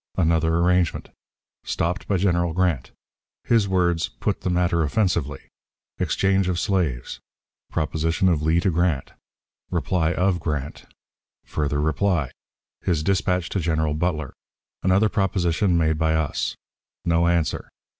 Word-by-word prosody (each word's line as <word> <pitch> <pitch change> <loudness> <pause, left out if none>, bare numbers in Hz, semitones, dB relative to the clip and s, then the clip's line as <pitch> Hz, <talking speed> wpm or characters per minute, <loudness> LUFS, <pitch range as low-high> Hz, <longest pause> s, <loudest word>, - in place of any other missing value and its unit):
Another 80 -2 +2
Arrangement. 90 -1 +1 0.5
Stopped 90 +4 -2
by 100 - +1
General 85 -3 +1
Grant. 85 -7 0 0.5
His 115 -4 +3
words, 85 -3 +1
"Put - - -3
the - - -1
Matter 90 -1 +1
offensively." 80 -4 0 0.6
Exchange 95 -1 +1
of 90 -1 0
Slaves. 80 -13 -1 0.5
Proposition 80 +4 0
of 85 -5 +2
Lee 80 +2 +2
to 95 - +1
Grant. 85 -4 0 0.6
Reply 85 -3 0
of 90 0 +1
Grant. 75 -3 -4 0.6
Further 75 -1 -2
Reply. 75 -1 +1 0.5
His 80 -4 0
Dispatch 90 -2 0
to 100 - -1
General 80 -2 0
Butler. 80 -3 -2 0.5
Another 95 +4 +3
Proposition 95 -3 +1
made 80 -1 +1
by 80 -1 +2
us. 80 -2 -1 0.5
No 85 0 +3
Answer. 85 -2 0
85 Hz, 125 wpm, -23 LUFS, 80-90 Hz, 0.6 s, His